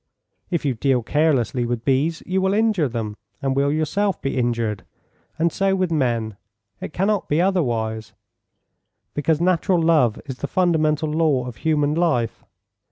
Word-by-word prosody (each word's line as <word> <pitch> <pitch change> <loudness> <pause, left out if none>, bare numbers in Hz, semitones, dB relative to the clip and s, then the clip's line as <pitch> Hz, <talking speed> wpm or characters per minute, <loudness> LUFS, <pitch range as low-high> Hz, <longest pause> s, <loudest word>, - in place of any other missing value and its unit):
If 170 -4 -1
you 135 - +1
deal 125 +1 +1
carelessly 135 -3 +1
with 120 -1 -3
bees 145 +5 +1
you 190 +1 0
will 190 +1 +1
injure 215 -8 +2
them, 110 -3 -4 0.2
and 135 -1 -1
will 140 +1 +2
yourself 170 +5 0
be 135 - -3
injured. 115 -5 -1 0.5
And 165 0 +1
so 195 0 +1
with 185 -2 0
men. 120 -8 0 0.4
It - - -6
cannot 195 +4 0
be 150 - +2
otherwise, 115 - 0 1.0
because 150 +1 +1
natural 180 +1 +2
love 155 -9 +3
is 130 -3 -7
the 140 - -3
fundamental 155 -3 +1
law 150 -5 +1
of 125 -3 -8
human 150 -1 +1
life. 155 -9 0
150 Hz, 155 wpm, -22 LUFS, 120-170 Hz, 1.0 s, love